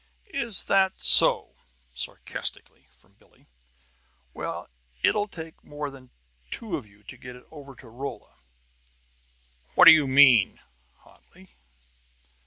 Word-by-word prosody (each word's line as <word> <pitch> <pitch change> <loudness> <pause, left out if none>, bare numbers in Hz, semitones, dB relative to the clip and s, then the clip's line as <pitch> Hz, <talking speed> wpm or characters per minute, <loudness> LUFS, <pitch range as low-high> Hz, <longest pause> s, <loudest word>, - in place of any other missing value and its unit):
"Is 235 -7 +1
that 190 -1 +1
so?" 60 0 +4 0.4
sarcastically, 60 - -6
from 65 -1 -31
Billie. - - -28 0.9
"Well, - - -7 0.4
it'll 205 0 +1
take 165 -4 -11
more 145 -1 -7
than 130 -2 -16 0.4
two 215 -7 -5
of 135 -9 -8
you 105 +1 -25
to - - -13
get 125 0 -12
it 125 - -17
over 140 -3 -13
to 130 - -14
Rolla!" 130 +5 -9 1.4
"What - - +6
do - - +12
you 155 -3 +4
mean?" 130 -6 +4 0.4
hotly. 185 +1 -19
140 Hz, 120 wpm, -25 LUFS, 125-170 Hz, 1.4 s, do